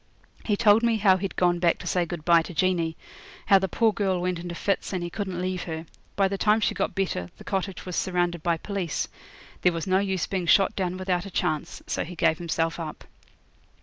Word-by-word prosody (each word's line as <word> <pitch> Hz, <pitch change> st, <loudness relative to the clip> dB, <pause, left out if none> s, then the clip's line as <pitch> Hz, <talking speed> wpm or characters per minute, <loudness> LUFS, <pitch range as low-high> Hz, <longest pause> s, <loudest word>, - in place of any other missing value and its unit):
He 205 Hz, -2 st, 0 dB
told 215 Hz, 0 st, +5 dB
me 235 Hz, -1 st, +2 dB
how 195 Hz, -3 st, +5 dB
he'd 195 Hz, +1 st, -4 dB
gone 175 Hz, -1 st, +2 dB
back 170 Hz, -1 st, +3 dB
to -, -, -10 dB
say 175 Hz, -2 st, 0 dB
good 160 Hz, -2 st, -6 dB
bye 170 Hz, -1 st, +6 dB
to 165 Hz, +1 st, -8 dB
Jeanie 170 Hz, -2 st, +1 dB, 0.5 s
how 195 Hz, -, +6 dB
the 190 Hz, -, -1 dB
poor 225 Hz, +3 st, +2 dB
girl 195 Hz, -4 st, 0 dB
went 180 Hz, -1 st, -1 dB
into 175 Hz, 0 st, -6 dB
fits, 195 Hz, +2 st, -1 dB
and 180 Hz, -2 st, -2 dB
he 175 Hz, -, -4 dB
couldn't 190 Hz, -3 st, -4 dB
leave 185 Hz, 0 st, -2 dB
her. 160 Hz, -1 st, -5 dB, 0.3 s
By 195 Hz, -1 st, +3 dB
the 195 Hz, 0 st, -3 dB
time 215 Hz, +1 st, +4 dB
she 215 Hz, -, +1 dB
got -, -, -2 dB
better 180 Hz, -, -2 dB
the -, -, -12 dB
cottage 195 Hz, -1 st, -3 dB
was 180 Hz, -2 st, -5 dB
surrounded 175 Hz, -2 st, 0 dB
by 170 Hz, 0 st, +1 dB
police; 190 Hz, -3 st, -3 dB, 0.5 s
there 180 Hz, -, +3 dB
was 165 Hz, -1 st, -3 dB
no 190 Hz, 0 st, +3 dB
use 190 Hz, -2 st, 0 dB
being 185 Hz, -3 st, -3 dB
shot 195 Hz, +3 st, +4 dB
down 185 Hz, -1 st, -2 dB
without 185 Hz, 0 st, -1 dB
a -, -, -7 dB
chance, 155 Hz, -4 st, -2 dB
so -, -, -2 dB
he 175 Hz, +2 st, -8 dB
gave 165 Hz, -1 st, +2 dB
himself 165 Hz, -1 st, -1 dB
up. 160 Hz, -2 st, -6 dB
180 Hz, 225 wpm, -26 LUFS, 170-195 Hz, 0.5 s, bye